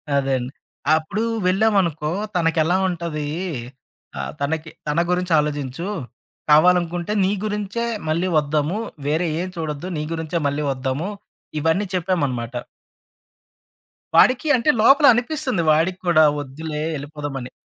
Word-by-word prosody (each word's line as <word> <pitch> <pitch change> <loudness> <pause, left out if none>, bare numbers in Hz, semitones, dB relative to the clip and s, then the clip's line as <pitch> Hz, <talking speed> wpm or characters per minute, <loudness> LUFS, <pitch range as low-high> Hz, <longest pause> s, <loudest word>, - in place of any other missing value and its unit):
అదే 135 -1 +1
అండి. 125 +1 -5 0.4
అప్పుడు 160 +8 -2 0.2
వెళ్ళామనుకో 185 -6 +2 0.3
తనకెలా 165 0 +2
ఉంటది? 165 -4 -3 0.9
ఆహ్, 70 0 -3
తనకి 160 +3 -2 0.2
తన 150 +2 +1
గురించి 180 0 -1
ఆలోచించు, 145 +2 -3 0.6
కావాలనుకుంటే 175 +3 +4
నీ 190 - +2
గురించే 210 +2 -2 0.2
మళ్ళీ 170 +4 +1
వద్దాము. 150 +4 0 0.3
వేరే 160 +4 +1
ఏం 185 - -3
చూడొద్దు 155 0 -4
నీ 150 - -2
గురించే 165 +1 -2
మళ్ళీ 145 +2 -1
వద్దాము, 135 +6 -2 0.5
ఇవన్నీ 160 +6 +1
చెప్పామనమాట. 145 -10 -1 1.6
వాడికి 260 +5 +5
అంటే 250 +5 +2
లోపలనిపిస్తుంది 260 - +4
వాడికి 175 +4 +1
కూడా, 155 -2 +6 0.2
వద్దులే 150 +2 -5
ఎళ్ళిపోదామని. 145 -3 -6
160 Hz, 110 wpm, -22 LUFS, 150-185 Hz, 1.6 s, కూడా